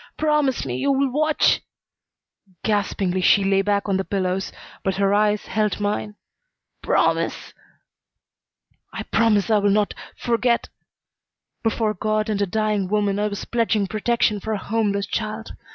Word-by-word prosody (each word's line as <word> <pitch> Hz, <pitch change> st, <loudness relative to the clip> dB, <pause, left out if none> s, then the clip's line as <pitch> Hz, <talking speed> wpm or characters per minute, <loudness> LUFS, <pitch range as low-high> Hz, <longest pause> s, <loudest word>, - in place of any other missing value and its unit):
Promise 300 Hz, -, +1 dB
me 125 Hz, -1 st, -3 dB
you'll 275 Hz, -, +1 dB
watch 310 Hz, +3 st, +2 dB, 0.5 s
" 185 Hz, -3 st, -36 dB
Gaspingly 195 Hz, -3 st, 0 dB
she 200 Hz, +2 st, +5 dB
lay 195 Hz, 0 st, +3 dB
back 200 Hz, 0 st, 0 dB
on 195 Hz, -2 st, +1 dB
the 190 Hz, -, -1 dB
pillows, 190 Hz, -1 st, -2 dB, 0.3 s
but 190 Hz, -1 st, 0 dB
her 195 Hz, 0 st, +2 dB
eyes 210 Hz, 0 st, +2 dB
held 215 Hz, -2 st, -1 dB
mine. 210 Hz, 0 st, -2 dB, 0.7 s
"Promise -, -, 0 dB, 0.7 s
" -, -, -48 dB
"I -, -, -4 dB
promise 225 Hz, -1 st, +2 dB
I 215 Hz, -, +5 dB
will 205 Hz, 0 st, +2 dB
not 205 Hz, +1 st, +2 dB, 0.2 s
forget." 235 Hz, 0 st, 0 dB, 0.9 s
Before 225 Hz, -1 st, 0 dB
God 215 Hz, +2 st, -1 dB
and 205 Hz, -1 st, -1 dB
a 200 Hz, -, +1 dB
dying 210 Hz, 0 st, 0 dB
woman 205 Hz, 0 st, 0 dB
I 210 Hz, -, +1 dB
was 200 Hz, -1 st, -5 dB
pledging 225 Hz, -3 st, +1 dB
protection 215 Hz, +1 st, 0 dB
for 220 Hz, +3 st, -3 dB
a -, -, -1 dB
homeless 200 Hz, -1 st, -1 dB
child. 215 Hz, 0 st, -4 dB
210 Hz, 150 wpm, -22 LUFS, 200-220 Hz, 0.9 s, she